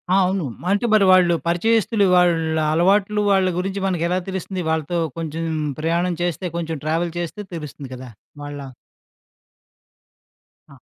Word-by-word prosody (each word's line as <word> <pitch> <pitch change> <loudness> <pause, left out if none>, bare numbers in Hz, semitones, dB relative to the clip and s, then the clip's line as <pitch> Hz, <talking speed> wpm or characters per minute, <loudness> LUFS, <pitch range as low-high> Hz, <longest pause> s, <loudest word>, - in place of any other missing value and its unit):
ఆ! - - +5
అవును. 185 -3 -1 0.3
అంటే 205 +4 +1
మరి 205 -2 +5
వాళ్ళు 180 -2 +5
పరిచయస్తులు 215 +3 +2
వాళ్ళ 165 -3 +3 0.2
అలవాట్లు 200 +5 +2
వాళ్ళ 190 -1 +3
గురించి 195 +2 -2
మనకెలా 180 0 0
తెలుస్తుంది? 190 0 -4
వాళ్ళతో 160 +2 -1 0.2
కొంచెం 165 0 -4 0.4
ప్రయాణం 170 +2 0
చేస్తే 175 +1 -2
కొంచెం 165 -2 -3
ట్రావెల్ 165 +2 0
చేస్తే 175 +5 -5
తెలుస్తుంది 145 -4 -8
కదా! 125 0 -9 0.3
వాళ్ళ 145 0 -6 2.1
ఆ! - - -15
175 Hz, 125 wpm, -21 LUFS, 165-190 Hz, 2.1 s, ఆ